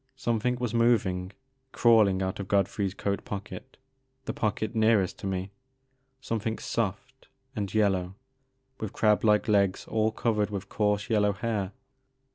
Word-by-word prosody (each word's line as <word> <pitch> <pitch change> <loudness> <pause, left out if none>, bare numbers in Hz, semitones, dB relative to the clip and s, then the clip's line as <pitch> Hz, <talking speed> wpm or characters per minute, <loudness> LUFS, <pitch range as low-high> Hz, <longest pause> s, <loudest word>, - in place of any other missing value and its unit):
Something 120 +1 0
was 125 -3 -3
moving, 100 -6 +2 0.2
— 130 0 -47
crawling 105 -5 +4
out 95 +1 -3
of 100 - -5
God 100 -2 +3
frey's 100 -1 -3
coat 100 0 -2
pocket, 105 +6 -7 0.2
— 130 0 -46
the - - -3
pocket 110 +1 -2
nearest 110 -5 +2
to - - -4
me, 95 0 -3 0.3
— 130 - -48 0.3
something 110 -2 -2
soft 115 +5 -4 0.3
and 100 -3 -3
yellow 95 -4 +1 0.6
with 110 -2 -5
crab 105 -1 +2
like 105 -1 +3
legs 100 -3 +2
all 110 0 +1
covered 105 -2 0
with 100 -2 -5
coarse 105 -1 0
yellow 105 -3 +2
hair. 100 -2 -2
105 Hz, 155 wpm, -28 LUFS, 100-115 Hz, 0.6 s, crawling